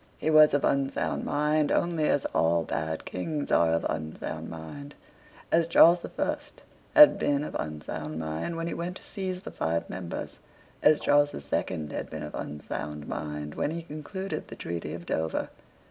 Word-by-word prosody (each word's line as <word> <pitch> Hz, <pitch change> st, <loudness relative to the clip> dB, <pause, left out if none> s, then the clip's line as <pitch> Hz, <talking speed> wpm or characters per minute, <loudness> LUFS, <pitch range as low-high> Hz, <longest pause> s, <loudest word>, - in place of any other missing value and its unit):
He 160 Hz, -, 0 dB
was 155 Hz, -2 st, +7 dB
of 145 Hz, -, +2 dB
unsound 135 Hz, 0 st, 0 dB
mind 150 Hz, +1 st, +1 dB
only 170 Hz, -3 st, +1 dB
as 145 Hz, -, +2 dB
all 80 Hz, +1 st, +3 dB
bad 80 Hz, 0 st, -3 dB
Kings 145 Hz, -, -3 dB
are 85 Hz, -1 st, +4 dB
of 80 Hz, -, +1 dB
unsound 80 Hz, 0 st, -4 dB
mind; 85 Hz, -, -8 dB, 0.6 s
as 165 Hz, 0 st, +4 dB
Charles 170 Hz, +1 st, +7 dB
the -, -, -7 dB
First -, -, -4 dB, 0.3 s
had 300 Hz, -1 st, +9 dB
been 145 Hz, 0 st, +1 dB
of -, -, -6 dB
unsound 75 Hz, 0 st, -5 dB
mind 80 Hz, -, -3 dB
when 165 Hz, 0 st, -3 dB
he 170 Hz, -, -2 dB
went 180 Hz, +2 st, -4 dB
to -, -, -16 dB
seize 185 Hz, -3 st, -4 dB
the -, -, -7 dB
five 85 Hz, +1 st, -1 dB
members; 90 Hz, -2 st, -6 dB, 0.4 s
as 150 Hz, 0 st, +5 dB
Charles 145 Hz, 0 st, +4 dB
the -, -, -7 dB
Second 75 Hz, +1 st, -2 dB
had -, -, -4 dB
been 80 Hz, -1 st, -6 dB
of 75 Hz, -, -7 dB
unsound 75 Hz, 0 st, -5 dB
mind 75 Hz, -1 st, -4 dB
when -, -, -1 dB
he 165 Hz, +1 st, -4 dB
concluded 170 Hz, +6 st, -5 dB
the -, -, -9 dB
treaty 85 Hz, 0 st, -4 dB
of 85 Hz, 0 st, -9 dB
Dover. 80 Hz, 0 st, -1 dB
140 Hz, 175 wpm, -28 LUFS, -, 0.6 s, had